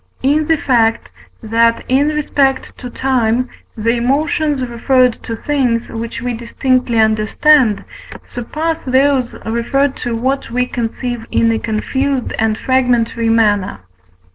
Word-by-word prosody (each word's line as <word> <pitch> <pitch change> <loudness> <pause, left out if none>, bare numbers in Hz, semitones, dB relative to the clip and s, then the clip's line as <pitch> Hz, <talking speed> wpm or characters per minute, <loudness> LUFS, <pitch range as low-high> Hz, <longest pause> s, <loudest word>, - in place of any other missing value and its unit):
In 295 +3 +2
the 325 - +3
fact, 230 -5 +1 0.3
that, 230 +1 +2
in 270 +3 +2
respect 280 -3 0
to 250 - -7
time, 250 -1 0 0.3
the 230 +2 +1
emotions 285 +2 0
referred 250 +1 +1
to 230 - -5
things, 245 -3 -1
which 230 +1 -5
we 245 -1 -2
distinctly 240 +1 0
understand, 220 +2 +3 0.4
surpass 315 +7 -4
those 260 -1 +1
referred 265 +5 0
to 240 -1 -3
what 265 +4 -1
we 250 +2 0
conceive 240 -1 -4
in 230 0 +2
a 225 - 0
confused 265 +4 -2
and 220 -1 +1
fragmentary 240 -3 +1
manner 210 - +2
(V. 90 0 -33
245 Hz, 130 wpm, -16 LUFS, 225-270 Hz, 0.4 s, the